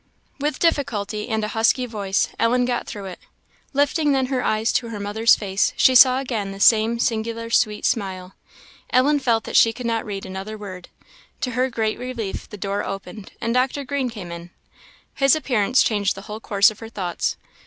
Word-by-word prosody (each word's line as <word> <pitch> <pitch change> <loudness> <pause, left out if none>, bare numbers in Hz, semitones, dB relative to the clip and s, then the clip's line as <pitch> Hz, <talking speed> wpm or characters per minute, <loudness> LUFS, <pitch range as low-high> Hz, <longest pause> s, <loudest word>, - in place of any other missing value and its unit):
With 295 +2 -1
difficulty, 230 -10 -1
and 220 -1 -1
a 210 - -2
husky 230 +3 +2
voice, 200 -5 -1
Ellen 245 +2 +2
got 245 -1 -2
through 205 -2 -7
it. 185 -2 -8 0.5
Lifting 290 +1 +2
then 265 -1 +1
her 255 - 0
eyes 215 +1 +1
to 235 - 0
her 215 -2 -6
mother's 215 +3 +3
face, 195 -2 0
she 260 - +5
saw 255 0 +7
again 225 -7 -3
the 195 - -9
same 225 +2 +4
singular 230 0 -2
sweet 215 -3 +1
smile. 190 -5 -2 0.6
Ellen 285 +4 +3
felt 235 -4 +1
that - - -6
she 225 - +6
could 240 +2 -8
not 230 -1 0
read 200 -2 -6
another 190 +3 -6
word; 185 -4 -9 0.5
to 250 - -1
her 255 +2 0
great 220 -2 -2
relief 245 -5 -5
the 210 - -9
door 200 0 -2
opened, 195 +1 -7
and 230 0 -1
Dr. 260 +3 0
Green 270 -1 -2
came 200 -7 -8
in. 170 0 -8 0.6
His 275 0 +4
appearance 255 -5 +2
changed 205 -3 0
the 195 - -8
whole 215 0 -7
course 200 -1 +3
of 215 - -14
her 225 - -9
thoughts. 185 -6 -3
225 Hz, 190 wpm, -22 LUFS, 205-250 Hz, 0.6 s, saw